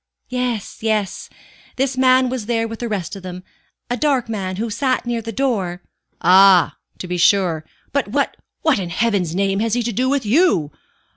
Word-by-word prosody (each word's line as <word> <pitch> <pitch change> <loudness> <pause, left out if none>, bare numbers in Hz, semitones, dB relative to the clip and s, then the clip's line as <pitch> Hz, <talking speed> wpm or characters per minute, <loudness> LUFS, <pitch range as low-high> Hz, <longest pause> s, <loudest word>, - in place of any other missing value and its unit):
"Yes, 250 -4 -3
yes; 215 -4 -1 0.5
this 265 0 0
man 260 0 +4
was 250 -4 -4
there 230 -1 0
with 225 0 -7
the 240 - -3
rest 200 -4 -3
of 195 - -10
us. 180 0 -7 0.5
A - - +2
dark 270 -3 +1
man, 195 -4 -3
who 225 +3 -3
sat 255 +3 0
near 240 -1 -2
the 225 +1 -6
door 200 -8 -1 0.2
" - - -48
"Ah, 185 0 +6 0.2
to 180 - -7
be 180 0 -2
sure. 175 -3 +3 0.3
But 280 -5 0
what 280 +7 -1 0.3
what 310 -9 +3
in 180 -3 -4
Heaven's 195 -5 0
name 195 0 +1
has 225 +1 0
he 245 - 0
to 235 0 -2
do 255 +5 +1
with 275 -3 0
you? 210 - +3
225 Hz, 195 wpm, -20 LUFS, 190-255 Hz, 0.5 s, Ah